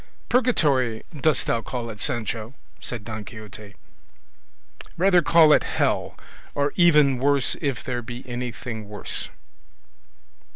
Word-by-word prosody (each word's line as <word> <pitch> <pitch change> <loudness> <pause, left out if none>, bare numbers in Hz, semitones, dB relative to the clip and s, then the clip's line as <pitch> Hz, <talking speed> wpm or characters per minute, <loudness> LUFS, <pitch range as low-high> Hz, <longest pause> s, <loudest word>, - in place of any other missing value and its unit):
"Purgatory 145 - +2
dost 150 +2 +1
thou 115 - 0
call 115 0 -5
it, 105 - -11
Sancho?" 115 +1 -3 0.2
said 120 -4 -6
Don 110 -1 -6
Quixote, 105 -2 -11 1.2
"rather 180 0 +4
call 160 -1 +6
it - - +5
hell, - - -1 0.4
or 145 0 0
even 150 -7 +5
worse 140 0 +3
if 140 -5 -2
there 120 -1 -3
be 120 +2 -9
anything 120 -3 -5
worse." 105 - -2
125 Hz, 120 wpm, -24 LUFS, 110-145 Hz, 1.2 s, call